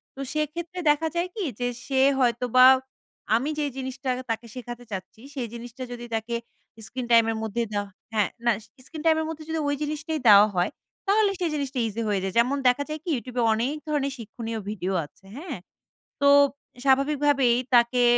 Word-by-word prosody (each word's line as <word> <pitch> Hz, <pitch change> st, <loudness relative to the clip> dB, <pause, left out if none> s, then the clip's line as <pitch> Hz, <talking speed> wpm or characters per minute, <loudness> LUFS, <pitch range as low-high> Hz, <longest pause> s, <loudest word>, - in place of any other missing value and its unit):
তো -, -, -13 dB
সেক্ষেত্রে 330 Hz, +4 st, -3 dB
দেখা 310 Hz, +2 st, +3 dB
যায় 345 Hz, +1 st, 0 dB
কি? 415 Hz, -, -2 dB, 0.2 s
যে 245 Hz, -, 0 dB, 0.2 s
সে 265 Hz, -1 st, +1 dB, 0.2 s
হয়তোবা 250 Hz, +1 st, +4 dB, 0.7 s
আমি 265 Hz, +6 st, 0 dB
যেই 290 Hz, -2 st, -1 dB
জিনিসটা 260 Hz, 0 st, -4 dB, 0.2 s
তাকে 225 Hz, +1 st, -3 dB
শেখাতে 245 Hz, -1 st, -7 dB
চাচ্ছি 195 Hz, +3 st, -7 dB
সেই 245 Hz, -3 st, -3 dB
জিনিসটা 240 Hz, +2 st, -8 dB
যদি 240 Hz, 0 st, -6 dB
তাকে 225 Hz, +2 st, -2 dB, 0.5 s
screen 245 Hz, +1 st, -5 dB
টাইমের 225 Hz, -1 st, +5 dB
মধ্যে 220 Hz, +2 st, -1 dB
দেওয়া 205 Hz, -1 st, -2 dB, 0.2 s
হ্যাঁ 210 Hz, -3 st, +2 dB, 0.2 s
না 235 Hz, -, +5 dB, 0.3 s
screen 315 Hz, -1 st, -8 dB
টাইমের 320 Hz, 0 st, +3 dB
মধ্যে 315 Hz, -1 st, -6 dB
যদি 320 Hz, 0 st, -1 dB
ওই 285 Hz, -, +1 dB
জিনিসটাই 305 Hz, +1 st, -2 dB
দেওয়া 205 Hz, 0 st, +9 dB
হয় 175 Hz, 0 st, +1 dB, 0.4 s
তাহলে 410 Hz, 0 st, +4 dB
সেই 345 Hz, -2 st, 0 dB
জিনিসটা 275 Hz, -3 st, -2 dB
ইজি 225 Hz, +2 st, -4 dB
হয়ে 200 Hz, -2 st, +1 dB
যায়। 190 Hz, -, -2 dB
যেমন 260 Hz, +4 st, +2 dB
দেখা 250 Hz, +3 st, +3 dB
যায় 305 Hz, 0 st, -4 dB
কি? 355 Hz, -, -5 dB
YouTube 250 Hz, 0 st, -7 dB
এ -, -, +3 dB
অনেক 245 Hz, +7 st, -1 dB
ধরনের 280 Hz, -2 st, 0 dB
শিক্ষণীয় 225 Hz, 0 st, -6 dB
ভিডিও 195 Hz, -2 st, -3 dB
আছে, 195 Hz, -, -22 dB
হ্যাঁ? 305 Hz, -, -6 dB, 0.6 s
তো 280 Hz, -, +5 dB, 0.6 s
স্বাভাবিকভাবেই 275 Hz, -2 st, +3 dB, 0.2 s
তাকে 240 Hz, +1 st, +4 dB
255 Hz, 175 wpm, -25 LUFS, 230-295 Hz, 0.7 s, দেওয়া